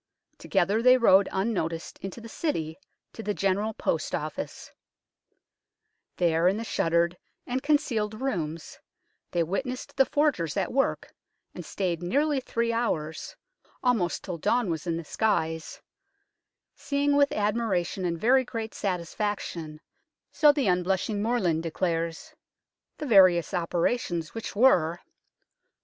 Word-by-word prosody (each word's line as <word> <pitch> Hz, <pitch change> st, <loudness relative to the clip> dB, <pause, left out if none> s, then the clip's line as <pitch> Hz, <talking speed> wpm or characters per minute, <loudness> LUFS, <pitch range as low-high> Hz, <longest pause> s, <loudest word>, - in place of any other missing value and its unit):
Together 200 Hz, +6 st, +1 dB
they 255 Hz, +1 st, +6 dB
rode 200 Hz, -5 st, +5 dB
unnoticed 180 Hz, -5 st, -2 dB
into 195 Hz, +4 st, -7 dB
the 230 Hz, -, -10 dB
City, 170 Hz, -, -3 dB, 0.3 s
to -, -, -7 dB
the 210 Hz, -2 st, -2 dB
General 200 Hz, +3 st, 0 dB
Post -, -, -1 dB
Office. -, -, -6 dB, 1.5 s
There, 170 Hz, -1 st, +3 dB
in 195 Hz, +3 st, +2 dB
the 225 Hz, -, -3 dB
shuttered 170 Hz, -4 st, +1 dB, 0.3 s
and 255 Hz, +1 st, -2 dB
con 295 Hz, +2 st, +4 dB
cealed 215 Hz, -5 st, -3 dB
rooms, 165 Hz, -, -4 dB, 0.5 s
they 170 Hz, -, +1 dB
witnessed 250 Hz, +9 st, -4 dB
the 270 Hz, -, +5 dB
forgers 270 Hz, -, 0 dB
at -, -, -1 dB
work, 270 Hz, +1 st, 0 dB, 0.4 s
and -, -, -7 dB
stayed 180 Hz, -4 st, -2 dB
nearly 280 Hz, -, +1 dB
three 235 Hz, -2 st, -1 dB
hours 160 Hz, -10 st, -2 dB, 0.5 s
almost 230 Hz, -9 st, +1 dB
till 180 Hz, -4 st, -5 dB
dawn 235 Hz, +1 st, +1 dB
was 160 Hz, +1 st, -4 dB
in 165 Hz, -1 st, 0 dB
the 165 Hz, -, -6 dB
skies 160 Hz, -5 st, -1 dB, 0.9 s
seeing 285 Hz, 0 st, 0 dB
with 285 Hz, 0 st, +4 dB
admira 210 Hz, -3 st, 0 dB
tion 190 Hz, -, -5 dB
and 170 Hz, -2 st, -1 dB
very 260 Hz, +5 st, +4 dB
great 225 Hz, -3 st, -5 dB
satisfaction, 180 Hz, -4 st, -3 dB, 0.5 s
so 300 Hz, -2 st, +6 dB
the 290 Hz, -3 st, -1 dB
unblushing 190 Hz, +3 st, 0 dB
Morland 205 Hz, -8 st, +1 dB
declares, 165 Hz, 0 st, -2 dB, 0.6 s
the 305 Hz, -, -5 dB
various 185 Hz, -, +5 dB
operations, 170 Hz, -1 st, -1 dB
which 225 Hz, -2 st, -6 dB
were: 180 Hz, -9 st, +4 dB
1. -, -, -24 dB
195 Hz, 130 wpm, -27 LUFS, 170-235 Hz, 1.5 s, they